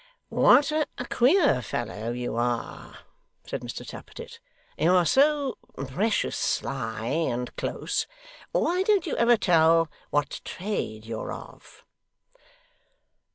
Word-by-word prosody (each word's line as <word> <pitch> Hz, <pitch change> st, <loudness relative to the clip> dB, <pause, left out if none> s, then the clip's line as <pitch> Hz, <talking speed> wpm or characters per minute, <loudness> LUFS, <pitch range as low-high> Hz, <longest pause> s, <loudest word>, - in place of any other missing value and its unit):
'What 285 Hz, +1 st, +5 dB
a 310 Hz, -1 st, +1 dB, 0.2 s
queer 265 Hz, -, +4 dB
fellow 115 Hz, -1 st, -4 dB
you 120 Hz, -1 st, -3 dB
are!' 120 Hz, 0 st, -3 dB, 0.5 s
said -, -, -4 dB
Mr -, -, -7 dB
Tappertit. -, -, -10 dB, 0.4 s
'You're 180 Hz, +2 st, +3 dB
so 280 Hz, -, +2 dB, 0.3 s
precious 205 Hz, -, 0 dB
sly 115 Hz, -5 st, -2 dB
and 125 Hz, -3 st, -1 dB
close. -, -, -2 dB, 0.4 s
Why 360 Hz, +2 st, +1 dB
don't 395 Hz, -2 st, +2 dB
you 320 Hz, -, -2 dB
ever 235 Hz, 0 st, +5 dB
tell 165 Hz, -3 st, +4 dB, 0.2 s
what 145 Hz, 0 st, -1 dB
trade 110 Hz, -, -4 dB
you're 110 Hz, 0 st, -5 dB
of? -, -, -11 dB
165 Hz, 110 wpm, -26 LUFS, -, 0.5 s, What